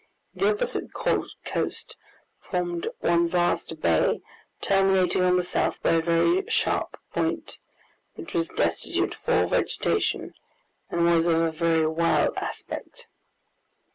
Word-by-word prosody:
The 395 - +2
opposite 475 +4 -3
coast - - -2 0.4
formed 175 -2 -3
one 170 0 +3
vast 170 -2 0
bay, 80 -2 +2 0.4
terminating 195 -2 +3
on 180 0 +4
the 180 - +1
south 180 - -1
by - - +3
a 165 0 +3
very 170 - +2
sharp 455 - 0 0.2
point, - - -2 0.6
which 330 - -9
was 165 -1 0
destitute 85 0 -1
of - - -9
all - - +4
vegetation, - - 0 0.6
and 170 - 0
was 170 0 +4
of 165 -1 +3
a 165 -1 +1
very 165 0 +2
wild 165 +2 +2
aspect. - - -6
170 Hz, 125 wpm, -26 LUFS, 165-185 Hz, 0.6 s, on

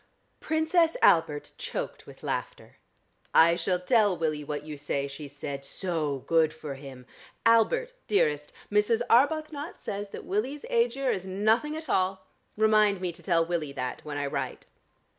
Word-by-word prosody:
Princess 320 +1 +2
Albert 150 -3 +3
choked - - -5
with - - -14
laughter. - - -4 0.6
"I 170 +1 +7
shall 180 +1 0
tell 205 -1 +3
Willie 155 -2 -1
what 145 0 -4
you 155 0 -7
say," 140 -1 -2
she 140 +2 -8
said. 140 0 -6
"So 150 -4 -3
good 160 -2 +3
for 150 -3 -6
him. 135 -2 -10 0.4
Albert 475 - +3
dearest, 150 - +1 0.2
Mrs. 210 +3 +3
Arbuthnot 305 +4 +2
says 205 0 -5
that - - -8
Willie's 250 +9 -2
Aegir 465 - +2
is 190 0 -5
nothing 220 +11 +1
at 315 -1 -8
all. 190 0 0 0.3
Remind 215 -2 +4
me 180 -1 -2
to 170 - -12
tell 170 -3 +2
Willie 165 -4 -2
that, 125 -2 -4
when 150 -1 -5
I 145 - -1
write." 140 - -4
185 Hz, 155 wpm, -28 LUFS, 150-230 Hz, 0.6 s, I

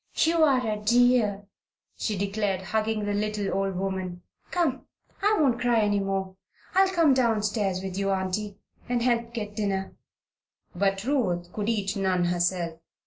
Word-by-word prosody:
"You 330 0 +3
are 265 -5 +3
a 215 -1 -1
dear!" 235 -3 +3 0.5
she 210 -3 -2
declared, 200 -1 -1
hugging 215 +1 -1
the 205 - -1
little 210 -1 -1
old 195 -1 -1
woman. 185 -2 -3 0.3
"Come! 330 -7 -1 0.3
I 420 +2 +3
won't 260 -6 +2
cry 240 -2 +3
any 205 -1 +2
more. 195 -1 -2 0.4
I'll 385 0 +5
come 335 -6 +4
down 230 -5 +2
stairs 200 -3 -1
with 190 -1 -5
you, 195 0 0
Auntie, 195 +2 -2 0.3
and 240 -1 +1
help 235 -1 +1
get 210 -3 -5
dinner." 195 -3 -2 0.8
But 195 +1 0
Ruth 185 -10 -1
could 210 +1 -2
eat 205 -3 -1
none 190 -3 +1
herself. 175 -1 0
205 Hz, 155 wpm, -26 LUFS, 190-235 Hz, 0.8 s, I'll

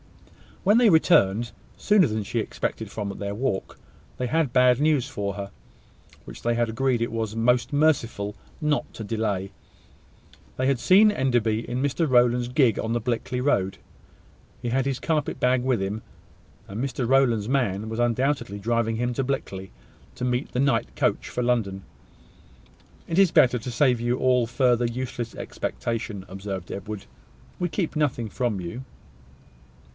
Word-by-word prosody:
When 205 +5 +5
they 240 -3 +6
returned, 120 - +4 0.3
sooner 205 -5 +4
than 110 -2 -2
she - - -4
had - - -1
expected, - - -4
from 105 -2 -4
their 100 0 -4
walk, 110 -4 -3 0.4
they 125 - -2
had 155 -2 0
bad 125 -1 +5
news 150 -4 +2
for 100 -7 -3
her, 100 -1 -6 0.7
which - - -10
they 120 - +2
had 120 -1 +1
agreed 125 +1 0
it 115 - -1
was 110 -1 -3
most 120 +2 +2
merciful 120 -9 +1 0.2
not 150 -2 0
to 110 - -6
delay. 105 -3 -2 1.1
They 130 - 0
had 135 -3 +2
seen 205 - +6
Enderby 120 - 0
in 125 +2 -2
Mr 145 +4 0
Rowland's 120 -1 +3
gig 125 -4 +2
on 115 +1 -1
the 120 - 0
Blickley 125 +1 -2
road. 100 -9 +1 0.8
He 120 - -2
had 130 +2 +1
his 135 -2 -1
carpet 155 -4 -1
bag 125 0 +2
with 130 -5 +1
him; 100 +3 -3 0.7
and 105 +6 -4
Mr 125 -2 -2
Rowland's 120 -5 +3
man 110 -6 0
was 110 +1 -4
undoubtedly 120 -3 0
driving 115 +1 0
him 120 +2 -1
to 135 - 0
Blickley, 100 -8 -4 0.4
to 125 - -3
meet 125 +2 -1
the 125 - -2
night 130 - +1
coach - - 0
for 125 - -3
London. 105 -6 0 1.2
"It 165 - -2
is 195 -4 +5
better 125 -5 +4
to 125 +3 -6
save 125 0 +3
you 120 +1 0
all 125 -2 +2
further 125 -1 +2
useless 120 -1 -4
expectation," 110 -4 -4
observed 95 -1 -6
Edward. 100 +1 -6 0.5
"We 175 -1 0
keep 170 -2 -2
nothing 130 -7 0
from 120 -3 -1
you." 90 +9 -6
120 Hz, 160 wpm, -25 LUFS, 110-135 Hz, 1.2 s, they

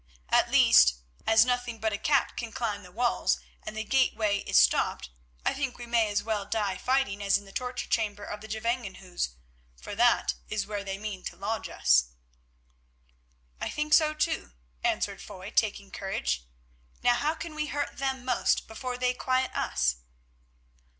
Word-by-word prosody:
At - - +4
least, 60 0 +6 0.3
as 225 +1 +6
nothing 245 -2 -1
but 220 0 0
a - - -1
cat 280 -3 +2
can 235 -2 -5
climb 220 -5 -2
the 180 -2 -14
walls, 240 +5 +1 0.2
and 215 - -7
the 220 - -1
gateway 220 -4 +2
is - - +1
stopped, 60 0 +3 0.3
I - - +2
think 270 -2 -3
we 240 - -7
may 230 -2 +2
as 205 0 0
well 215 -2 -1
die 205 -2 -1
fighting 255 -6 +1
as 200 0 +3
in 200 - -11
the 195 - -13
torture 250 +3 -4
chamber 205 -3 -1
of 210 - -6
the 220 - -9
Gevangenhuis, 210 - -3 0.4
for - - -7
that 235 +3 +3 0.2
is 215 -2 -1
where 205 -1 -4
they 195 -1 -4
mean 200 -2 -6
to - - -5
lodge 205 +5 -3
us." 60 0 +4 1.5
"I - - -2
think 300 0 -1
so 310 -1 +5
too," 65 - -1 0.3
answered - - 0
Foy, - - -9
taking - - 0
courage. 60 -1 -2 0.6
"Now 245 - +5
how 300 +6 0
can 330 0 -7
we 305 0 -2
hurt 290 -1 -3
them 265 -2 -2
most 250 -2 +1
before 250 +3 -5
they 250 0 +1
quiet 255 +1 0
us?" 60 0 +1
220 Hz, 170 wpm, -28 LUFS, 200-250 Hz, 1.5 s, least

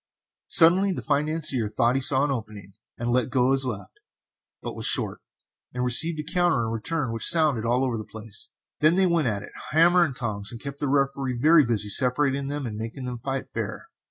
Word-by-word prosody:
Suddenly 185 +4 +5
the - - -6
financier 150 -5 -1
thought 115 +3 +1
he 135 - -1
saw 135 +1 +2
an 145 - 0
opening, 105 -6 -7 0.2
and 120 0 -3
let 125 0 0
go 130 0 +1
his 135 0 +1
left, 100 -6 -7 0.6
but - - -6
was - - -1
short, - - 0 0.5
and 125 - -2
received 155 +7 +3
a - - -3
counter 170 -6 0
in 110 - -4
return 130 +4 -3
which 115 - +3
sounded 155 -9 +4
all 125 +3 +1
over 120 -3 -3
the - - -6
place; 110 0 -8 0.3
then 155 +3 +3
they 190 0 +3
went 170 -6 +1
at 100 -3 -3
it - - -12 0.2
hammer 175 +3 +4
and 140 -6 -3
tongs 105 -5 -4
and 115 - -9
kept 140 +2 -8
the 145 - -2
Referee 135 -2 -1
very 155 +5 +5
busy 110 -4 +1
separating 135 +3 +2
them, 145 -1 -4
and 110 -3 -6
making 115 +4 -7
them 125 -1 -6
fight 135 +2 -5
fair. - - -6
130 Hz, 210 wpm, -24 LUFS, 115-150 Hz, 0.6 s, Suddenly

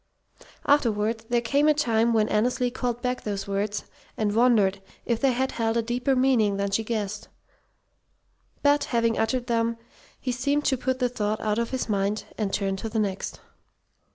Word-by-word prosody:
Afterward 225 -5 +2
there 240 -1 +2
came 280 +6 +2
a 305 - +5
time 235 -5 +2
when 220 -2 +3
Annesley 245 +3 +1
called 245 -1 -3
back 250 0 -1
those 200 -2 -4
words 200 +1 -2 0.3
and 210 -2 0
wondered 215 -5 +3 0.2
if 235 -2 -1
they 270 -2 +4
had 260 +2 0
held 225 0 0
a 230 - +1
deeper 245 +3 0
meaning 245 -6 +3
than 200 0 -1
she 225 - +1
guessed. 210 -2 -3 1.4
But, 290 0 +4
having 230 -2 +1
uttered 240 +3 0
them, 230 -1 0 0.4
he 255 - -2
seemed 280 +4 0
to 265 - +3
put 255 +1 -1
the 250 -1 +1
thought 215 -3 -2
out 215 0 0
of 235 - -1
his 260 -2 -2
mind, 205 0 0
and 210 -3 -2
turn 195 -1 -1
to 225 - -4
the 225 - -3
next. 200 -3 -2
230 Hz, 180 wpm, -26 LUFS, 210-250 Hz, 1.4 s, a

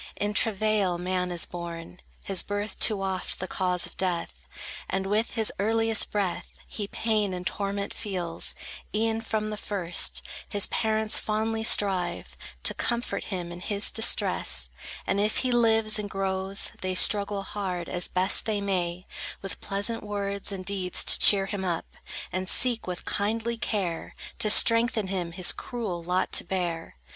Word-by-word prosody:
In 205 +1 -2
travail 210 -4 +1
man 180 0 -2
is 175 -1 +2
born; 170 0 -8 0.2
His 195 -2 +2
birth 205 0 -4
too 205 -3 +3
oft 190 -1 -3
the 185 - -4
cause 180 -1 +1
of - - -8
death, 180 -3 -1 0.6
And 190 0 -1
with 210 +4 0
his 220 -2 0
earliest 225 +1 +1
breath 200 -4 -3
He 205 -2 -5
pain 210 -3 -1
and 180 0 -7
torment 200 +1 -3
feels: 180 -5 -3 0.4
e'en 225 +1 0
from 215 -1 -2
the 210 - -4
first, 185 -5 0 0.3
His 205 -1 +3
parents 220 -1 +1
fondly 220 +1 -1
strive 185 -5 +1 0.3
To - - +2
comfort 240 0 -2
him 180 -3 -5
in 175 - -8
his 200 +2 +3
distress; 225 - +2 0.3
And 195 - 0
if 210 +1 +1
he 255 - +1
lives 225 -2 +4
and 205 -1 -4
grows, 195 0 +1
They 185 0 -2
struggle 200 +1 +3
hard, 185 -4 -4
as 175 -1 -1
best 185 +2 +2
they 215 -2 -1
may, 180 -2 -2 0.4
With 195 - -6
pleasant 205 +4 0
words 200 -1 -3
and 190 -2 -6
deeds 190 -2 0
to - - +7
cheer 195 -2 +8
him 195 -1 -4
up, 175 -3 -2 0.5
And 185 0 -3
seek 240 -4 +3
with 180 -1 -5
kindly 225 +3 -1
care, 195 -7 -3 0.2
To 215 - +3
strengthen 230 -2 +5
him 180 -3 -3
his 180 0 +1
cruel 215 -8 -5
lot 180 +2 -1
to - - +3
bear. 175 -2 -4
200 Hz, 160 wpm, -27 LUFS, 180-215 Hz, 0.6 s, cheer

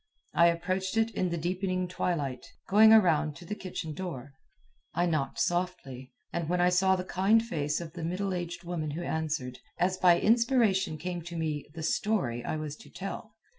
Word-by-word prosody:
I 170 - +6
approached 185 +4 -1
it 225 0 +2
in 185 -3 -1
the 170 - -2
deepening 185 +2 -1
twilight, 150 -8 -2 0.2
going 220 +2 +7
around 160 -8 +4
to 175 - -11
the 210 - -4
kitchen 180 -6 -5
door. 145 -6 -6 0.6
I 175 - +2
knocked 155 -6 -1
softly, 175 -8 -2 0.2
and 170 -2 -2
when 180 0 +1
I 180 0 +4
saw 190 +1 +3
the 185 - -3
kind 195 +5 +2
face 150 -8 -1
of 165 -2 -8
the 170 - -6
middle 185 +4 -2
aged 175 0 -4
woman 170 -3 -3
who 160 +4 -4
answered, 150 -6 -3 0.2
as 185 +1 +1
by 175 -2 +5
inspiration 225 -7 +3
came 175 +2 -4
to 170 +1 -8
me 155 -3 -2
the 160 - -5
"story" 155 - 0
I - - -2
was 155 -1 -4
to - - -15
tell. 210 +3 -7
175 Hz, 185 wpm, -29 LUFS, 155-190 Hz, 0.6 s, going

